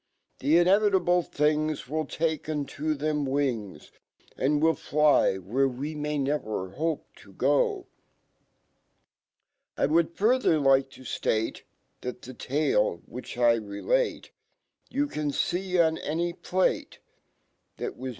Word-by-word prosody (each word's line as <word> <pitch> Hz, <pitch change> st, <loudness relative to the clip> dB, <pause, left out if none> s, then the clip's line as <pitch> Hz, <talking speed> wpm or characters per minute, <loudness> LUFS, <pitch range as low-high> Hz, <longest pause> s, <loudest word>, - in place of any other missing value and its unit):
The 150 Hz, +5 st, +3 dB
inevitable 185 Hz, -1 st, +4 dB
ihings 155 Hz, -1 st, 0 dB
Wii -, -, -22 dB
1 155 Hz, 0 st, -2 dB
take 160 Hz, -1 st, -2 dB
u 155 Hz, -, -2 dB
nt 145 Hz, -2 st, -4 dB
o 155 Hz, +1 st, +1 dB
them 150 Hz, 0 st, -1 dB
wi 140 Hz, +1 st, +1 dB
ng 105 Hz, -9 st, -8 dB
$, -, -, -19 dB, 0.4 s
And 145 Hz, +3 st, +1 dB
wil 160 Hz, +2 st, +4 dB
1 -, -, -5 dB
fly 150 Hz, -9 st, +3 dB
where 120 Hz, +9 st, 0 dB
^wemay 150 Hz, +3 st, -3 dB
never 120 Hz, -9 st, -2 dB
hope 160 Hz, +7 st, -2 dB
to 430 Hz, -6 st, 0 dB, 1.9 s
I -, -, +2 dB
would 160 Hz, +3 st, +2 dB
further 230 Hz, -5 st, +3 dB
like 135 Hz, -2 st, +3 dB
to -, -, -14 dB
ftate, 110 Hz, -2 st, -1 dB, 0.4 s
That 125 Hz, 0 st, -6 dB
fhe 130 Hz, 0 st, -9 dB
tale/ 130 Hz, -, 0 dB
which 125 Hz, 0 st, -8 dB
L 120 Hz, -1 st, +4 dB
relate, 110 Hz, -, -1 dB, 0.6 s
YOU 285 Hz, +2 st, 0 dB
can 150 Hz, -, -3 dB
tco 175 Hz, +1 st, +1 dB
nanypLato 175 Hz, +3 st, -1 dB, 0.8 s
That'wairna. 130 Hz, +1 st, -5 dB
150 Hz, 130 wpm, -27 LUFS, 130-165 Hz, 1.9 s, inevitable